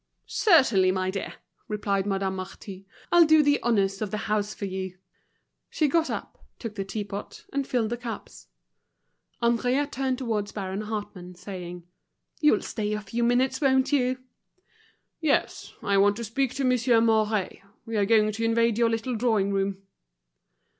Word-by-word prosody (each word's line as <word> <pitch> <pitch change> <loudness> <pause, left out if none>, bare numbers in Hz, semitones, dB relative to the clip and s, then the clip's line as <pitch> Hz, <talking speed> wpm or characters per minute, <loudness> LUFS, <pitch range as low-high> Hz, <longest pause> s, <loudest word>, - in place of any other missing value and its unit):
"Certainly, 235 - +4
my 185 0 -1
dear," 195 - -5 0.3
replied 200 -2 -1
Madame 195 -1 -1
Marty. 190 +1 -8 0.2
"I'll 345 0 +8
do 310 -1 +6
the 290 0 +2
honors 200 -4 +1
of 215 - -1
the 215 - -3
house 210 -1 0
for 205 - -5
you." 190 -1 -5 0.7
She 305 - +1
got 325 +3 +1
up, - - -6
took 230 -3 -6
the 200 -2 -3
teapot, 200 0 -6
and 275 -1 -1
filled 230 -3 0
the 240 - -1
cups. 235 -1 -8 1.0
Henriette 250 +5 +1
turned 260 0 -1
towards 220 -5 -2
Baron 195 0 -4
Hartmann, 205 -4 -6
saying: 180 -1 -8 0.6
"You'll 300 -2 +3
stay 210 -2 -3
a 210 - -2
few 230 +4 -3
minutes, 245 +5 +2
won't 265 -1 +3
you?" 255 -2 +2 1.0
"Yes; 310 -4 0
I 200 -1 +2
want 205 +1 +4
to 235 - -5
speak 255 +3 -1
to 275 - -1
Monsieur 250 -2 +3
Mouret. 220 -3 +1 0.2
We 225 - -5
are 205 -2 +2
going 215 0 +4
to 225 +2 -4
invade 230 0 +2
your 235 -1 +4
little 230 +2 -2
drawing 215 -4 +1
room." 195 0 -1
220 Hz, 160 wpm, -26 LUFS, 195-250 Hz, 1.0 s, I'll